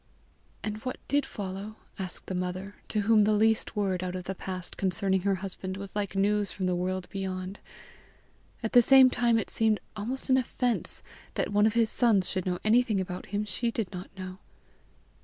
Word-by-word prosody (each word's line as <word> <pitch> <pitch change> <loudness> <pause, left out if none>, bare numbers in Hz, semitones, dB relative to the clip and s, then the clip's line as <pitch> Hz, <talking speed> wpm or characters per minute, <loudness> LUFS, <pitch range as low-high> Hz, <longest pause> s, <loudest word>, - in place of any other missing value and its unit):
"And 215 0 -3
what 255 +4 -5
did 285 +1 +1
follow?" 200 +2 -6 0.2
asked 185 -2 -4
the - - -4
mother, 180 +2 -3
to 215 - 0
whom 215 +1 +5
the 215 +1 +3
least 220 +1 +2
word 195 -3 0
out 180 0 -3
of 185 - -4
the 190 - -3
past 185 -1 -6
concerning 190 0 +1
her 195 +1 +2
husband, 190 0 -4
was 195 0 -8
like 200 -2 -2
news 205 +1 +2
from 190 - -3
the 180 - +1
world 185 +1 -2
beyond. 190 0 -4 1.0
At 225 - -2
the 245 - +9
same 260 +1 +7
time 235 -2 +3
it 225 - -2
seemed 220 -2 +2 0.2
almost 235 +6 -3
an 260 - +5
offence 250 -1 -1 0.3
that 205 - -1
one 210 +1 +5
of 220 - -1
his 230 -2 +3
sons 220 -6 +3
should 185 -1 -2
know 180 -1 0
anything 225 -1 +3
about 180 -1 -4
him 205 +2 -2
she 220 +4 -1
did 225 -5 -3
not 180 0 -7
know. 185 0 -7
200 Hz, 195 wpm, -29 LUFS, 185-220 Hz, 1.0 s, the